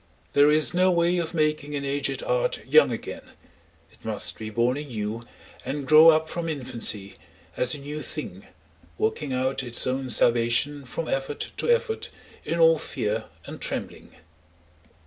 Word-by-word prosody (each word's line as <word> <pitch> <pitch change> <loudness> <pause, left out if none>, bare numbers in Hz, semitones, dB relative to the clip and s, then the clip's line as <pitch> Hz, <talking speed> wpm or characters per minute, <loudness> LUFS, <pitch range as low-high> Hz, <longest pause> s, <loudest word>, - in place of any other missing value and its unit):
There 145 +1 +6
is 155 +2 +4
no 185 +1 +3
way 175 0 +2
of 170 0 -4
making 150 -2 0
an 140 -1 -3
aged 140 - -2
art - - -1
young 470 - +5
again; - - -6 0.7
it - - -24
must - - +1
be 110 -1 -5
born 120 +3 +1
anew 115 -5 -5 0.4
and 140 0 -4
grow 155 +3 +8
up 160 0 +3
from 170 0 -4
infancy 120 -8 -3 0.4
as 125 +3 +1
a - - -7
new 145 +2 -6
thing, 100 - -7 0.5
working 140 +5 -1
out 130 +1 -1
its 120 -2 0
own 130 0 -2
salvation 120 +5 +2
from 160 +5 -5
effort 135 +2 -3
to - - -1
effort 475 -1 0 0.3
in 170 - -2
all 165 -1 +5
fear - - -3 0.2
and - - -9
trembling. - - -4
145 Hz, 155 wpm, -25 LUFS, 125-165 Hz, 0.7 s, grow